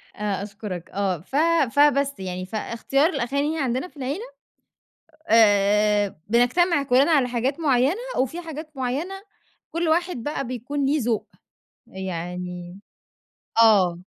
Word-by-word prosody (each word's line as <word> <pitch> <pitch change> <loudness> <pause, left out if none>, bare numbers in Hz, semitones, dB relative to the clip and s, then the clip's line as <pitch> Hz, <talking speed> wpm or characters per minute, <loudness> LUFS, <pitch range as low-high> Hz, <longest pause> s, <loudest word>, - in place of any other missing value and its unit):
آآ، 205 -2 -2
أشكرك 200 -4 -7
آه. 190 -4 -1
ف 210 - -10 0.4
فبس 280 -2 +3
يعني 185 -1 -5
فإختيار 235 - 0
الأغاني 280 +2 -1
عندنا 260 +4 -1
في 310 - -22
العيلة 285 - -4 1.0
آآ، 210 -1 +4
بنجتمع 280 - +3
كلّنا 275 +4 +3
على 265 -5 +3
حاجات 255 +6 -1
معيّنة، 270 +1 +3 0.2
وفي 270 +7 -1
حاجات 315 -1 -8
معيّنة 270 +9 -2 0.6
كُلّ 335 0 -1
واحد 345 +1 +1
بَقى 290 -2 -3
بيكون 255 +4 -3
ليه 290 +1 +1
ذوق، 225 -2 -1 0.6
يعني 180 0 -6 0.8
آه. 185 -5 +4
245 Hz, 120 wpm, -24 LUFS, 200-290 Hz, 1.0 s, آآ